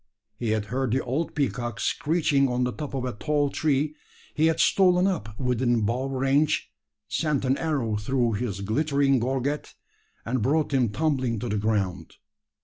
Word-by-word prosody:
He 120 - -1
had 110 -1 0
heard 130 -1 0
the 130 - +1
old 140 +7 -2
peacock 120 -5 -2
screeching 150 -3 +1
on 125 0 0
the 125 0 -1
top 150 -2 -6
of 130 -1 -2
a 125 - -3
tall 145 +4 0
tree; 150 0 0 0.4
he 155 +1 +3
had 160 0 +1
stolen 180 0 +4
up 110 - -2
within 125 -2 +1
bow 120 +6 0
range, 135 - +1 0.4
sent 150 -5 0
an 130 +1 +2
arrow 135 -10 -1
through 120 +2 0
his 100 -3 -3
glittering 140 +5 +2
gorget, 135 +4 -2 0.5
and 125 +1 -1
brought 145 +5 +1
him 125 -4 +3
tumbling 130 -2 0
to 120 +3 -4
the 105 - 0
ground. 100 -4 -1
130 Hz, 165 wpm, -26 LUFS, 120-150 Hz, 0.5 s, stolen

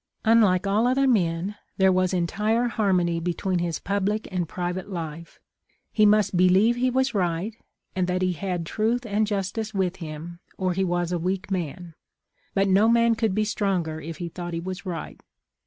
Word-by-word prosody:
" - - -24
Unlike 200 -5 +4
all 210 +4 +2
other 265 +2 +3
men, 190 -3 +1 0.2
there 190 -1 +5
was 185 0 +2
entire 210 +7 +1
harmony 180 -7 +1
between 175 +2 -1
his 170 -1 -1
public 205 +2 -1
and 175 -3 -2
private 180 +3 -4
life. 165 -2 -6 0.5
He 215 -1 +4
must 210 -2 +3
be 180 +1 +5
lieve 210 +6 +4
he 255 +1 +1
was 260 +1 +1
right, 185 +2 -1 0.4
and 185 -1 0
that 185 0 0
he 185 -1 +1
had 180 -1 -3
truth 225 +6 0
and 215 0 +1
jus 195 -2 -1
tice 220 -1 -5
with 190 -1 0
him, 165 0 -7 0.2
or 185 -1 0
he 190 +2 0
was 175 -1 -1
a 175 - 0
weak 185 +3 -2
man; 175 -1 -4 0.6
but 195 0 +3
no 200 +4 +4
man 235 0 +4
could 225 -4 0
be 215 0 +1
stronger 180 -7 -1
if 165 +1 -7
he 175 - -4
thought 175 0 -6
he - - -2
was 185 +3 -6
right. 170 -3 -6
185 Hz, 190 wpm, -25 LUFS, 175-210 Hz, 0.6 s, there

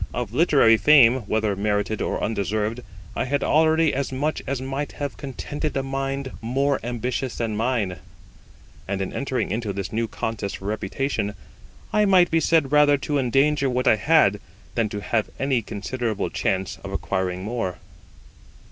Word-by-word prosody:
Of 120 -3 -3
literary 135 -6 +5
fame, 130 0 +6
whether 110 -2 0
merited 105 +1 -1
or - - -2
undeserved, 110 +2 -1 0.4
I - - -1
had 140 +2 0
already 160 0 +3
as 135 +1 -2
much 145 +4 -1
as 135 -1 -1
might 135 +2 -4
have 145 -1 -4
contented 145 +2 -4
a 135 - 0
mind 135 0 -3
more 135 +4 0
ambitious 120 +1 -3
than 115 -2 -2
mine; 110 -5 -1 0.9
and 100 0 -2
in 95 - -3
entering 130 -7 -2
into 110 -1 -2
this 95 -1 -5
new 115 +1 0
contest 105 -1 -4
for 95 - -12
reputation 105 +1 -2 0.6
I 210 0 +4
might 185 -3 +5
be 165 - +3
said 160 -4 +2
rather 150 -1 +5
to 145 +1 -1
endanger 135 +2 +2
what 125 0 -1
I 110 - +5
had 105 -6 +4 0.3
than 115 -3 0
to 105 0 -5
have 110 +1 -1
any 135 -3 +1
considerable 110 +1 -3
chance 95 -1 -1
of - - -6
acquiring 95 -1 -2
more. 105 -5 -3
125 Hz, 160 wpm, -23 LUFS, 105-140 Hz, 0.9 s, fame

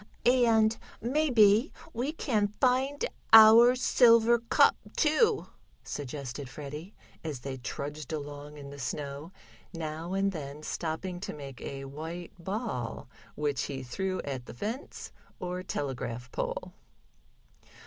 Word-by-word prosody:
"And 230 -3 +4 0.2
maybe 240 -3 +4 0.2
we 250 +6 -1
can 225 -10 0
find 260 +6 +1 0.3
our 225 +3 +10
silver 235 -2 +5
cup, 230 - +4 0.2
too," 405 +8 +3 0.4
suggested 140 -1 -6
Freddie, 150 - -8 0.3
as 150 -6 -5
they 135 0 -5
trudged 145 +5 -6
along 145 -1 -6
in 140 -1 -9
the 140 - -10
snow, 140 +4 -5 0.4
now 160 +2 -4
and 195 0 +1
then 150 -3 -7
stopping 175 +3 -3
to 200 +2 -5
make 135 -5 -9
a 135 0 -6
white 160 +5 -7
ball, 190 - -4 0.3
which 145 -5 -1
he 135 -2 -5
threw 185 +9 -2
at 130 -3 -5
the - - -9
fence 225 - -5 0.3
or 180 0 -3
telegraph 130 -7 -4
pole. - - -4
170 Hz, 120 wpm, -29 LUFS, 140-225 Hz, 0.4 s, our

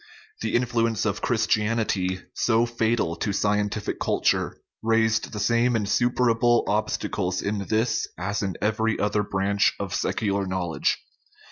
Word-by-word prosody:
The - - -1
influence 115 -3 +1
of 100 -2 -1
Christianity, 105 -5 0
so 115 0 +2
fatal 115 -7 0
to 105 - -1
scientific 105 +1 -1
culture, - - +1 0.2
raised 110 0 +1
the 105 - -5
same 120 +3 +2
insuperable 120 +2 +2
obstacles 100 -3 -1
in 100 -1 -2
this 110 +2 +1
as 95 +4 -2
in 95 -4 -2
every 110 +1 +1
other 105 0 +1
branch 100 0 +1
of - - -4
secular 100 -2 -1
knowledge. 95 -3 0
110 Hz, 125 wpm, -25 LUFS, 100-115 Hz, 0.2 s, so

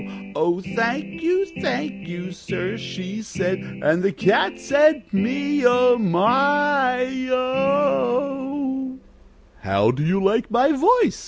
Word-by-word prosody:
'Oh, 175 +3 0
thank 230 +7 -3
you, 365 +4 +1 0.2
thank 220 -8 -3
you, 175 +1 -7
sir,' 185 +1 -5
she 190 +4 -7
said, 185 -2 -3 0.2
And 165 +3 +2
the 195 +1 +1
Cat 195 0 +1
said, 295 +1 +3
'Me 280 +8 0
oh! 245 0 +5
my 250 +6 +2 0.2
oh!'" 265 0 -1 0.7
"How 100 +3 +3
do 135 +4 -3
you 180 +5 +1
like 205 +5 +1
my 250 +6 +3
voice?" 425 - +3
245 Hz, 115 wpm, -22 LUFS, 190-275 Hz, 0.7 s, oh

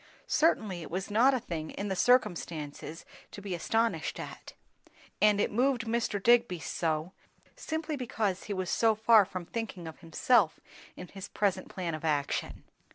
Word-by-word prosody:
Certainly 215 - +1
it 160 - -8
was 190 +4 -4
not 250 +6 +5
a - - 0
thing 160 -7 -5
in 200 - -5
the 190 - -1
circumstances 165 - 0 0.2
to - - -9
be 200 -2 -5
astonished 225 +6 0
at; - - -8 0.7
and 210 -1 +5
it - - +1
moved 250 +1 +2
Mr. 230 -2 -1
Digby 235 -3 +4
so, 160 +2 -2 0.4
simply 315 -1 -3
because 220 -7 -2
he 205 - -3
was 185 -2 -2
so 225 -1 +3
far 220 -1 +6
from 185 -2 -6
thinking 195 -4 -5
of 160 - -9
himself 180 +3 +2 0.4
in 180 - -8
his 195 -1 -8
present 190 -3 -1
plan 175 -3 -4
of 155 - -5
action. 145 -3 -1
200 Hz, 160 wpm, -30 LUFS, 175-230 Hz, 0.7 s, far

